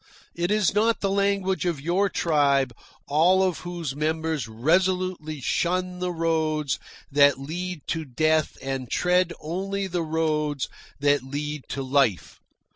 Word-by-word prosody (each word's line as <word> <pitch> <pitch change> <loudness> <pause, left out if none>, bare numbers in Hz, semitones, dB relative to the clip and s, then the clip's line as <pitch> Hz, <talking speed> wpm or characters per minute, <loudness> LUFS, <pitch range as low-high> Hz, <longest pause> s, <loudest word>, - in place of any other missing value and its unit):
It 175 +1 -1
is 210 -3 +2
not 225 +2 +2
the 195 - +1
language 195 -1 +1
of 170 -5 -1
your 180 +7 +1
tribe, 140 -7 +2 0.3
all 175 +6 +4
of 185 -3 0
whose 170 -6 -5
members 160 -3 -1
resolutely 170 +5 0
shun 180 +5 0
the 180 0 -1
roads 160 -3 0 0.3
that 140 -1 +5
lead 175 +4 -5
to 165 -1 -1
death 155 +3 +1
and 135 -2 -3
tread 180 0 +2
only 195 +5 -3
the 180 -2 -2
roads 155 -3 0 0.3
that 145 -1 +3
lead 145 +2 -5
to 135 - -3
life. 130 -8 +1
160 Hz, 135 wpm, -25 LUFS, 145-180 Hz, 0.3 s, that